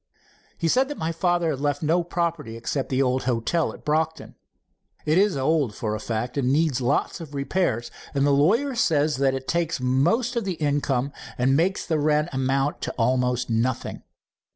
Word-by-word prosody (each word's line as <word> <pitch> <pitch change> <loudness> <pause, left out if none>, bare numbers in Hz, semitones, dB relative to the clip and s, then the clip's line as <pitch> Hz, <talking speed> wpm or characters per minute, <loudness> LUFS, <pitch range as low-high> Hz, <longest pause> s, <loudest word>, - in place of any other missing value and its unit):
"He 165 - -1
said 260 +10 +3
that 295 - -6
my 160 +1 -2
father 175 0 +1
had 135 - -4
left 145 +1 -1
no 170 +3 +2
property 170 -9 -2
except 130 +4 -3
the 135 +1 +2
old 130 0 0
hotel 125 +7 0
at - - -14
Brocton. 160 +1 -1 0.7
It 155 +4 +3
is 200 -5 +2
old, 135 -5 +1
for 110 -2 -2
a 110 - -3
fact, 120 +4 -3
and 130 -1 +1
needs 145 -3 +2
lots 140 +7 0
of 150 -3 -9
repairs, 140 -4 -1 0.2
and 140 0 +2
the 145 - +3
lawyer 210 - +3
says 155 - +2
that 135 -1 +2
this 135 - -4
takes 170 -2 0
most 145 - +1
of 235 - 0
the 190 -2 -2
income 140 -3 0 0.2
and 130 +2 +3
makes 180 +6 +1
the 160 -3 0
rent 150 +2 +2
amount 135 +2 0
to - - -2
almost 125 +1 +1
nothing. 115 +2 -1
145 Hz, 185 wpm, -24 LUFS, 130-165 Hz, 0.7 s, said